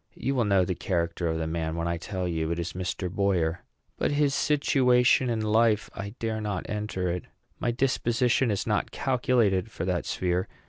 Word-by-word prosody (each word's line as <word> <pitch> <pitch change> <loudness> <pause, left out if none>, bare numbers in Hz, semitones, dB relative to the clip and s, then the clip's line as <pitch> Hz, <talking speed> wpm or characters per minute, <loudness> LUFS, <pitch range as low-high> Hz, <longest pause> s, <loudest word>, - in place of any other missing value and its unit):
You 135 - -1
will 125 -4 +1
know 100 -3 +3
the 90 - -1
character 85 -1 -1
of 80 0 0
the 80 - -2
man 80 0 -2
when 85 0 -2
I 85 0 -1
tell 90 +1 -4
you 80 -2 -1
it 85 - -1
is 85 -1 -3
Mr. 90 0 -3
Boyer. 90 -3 0 0.4
But - - +1
his 145 -1 +2
situation 130 -4 +3
in 115 -2 0
life! 110 0 +2
I 100 +3 -6
dare 110 -1 -2
not 105 -4 -3
enter 105 -3 -2
it. 90 0 -4 0.3
My - - 0
disposition 120 0 +1
is 100 -2 -1
not - - 0
calculated 120 -6 +1
for 90 - -5
that 90 -2 -1
sphere. 90 0 0
100 Hz, 190 wpm, -27 LUFS, 90-120 Hz, 0.4 s, know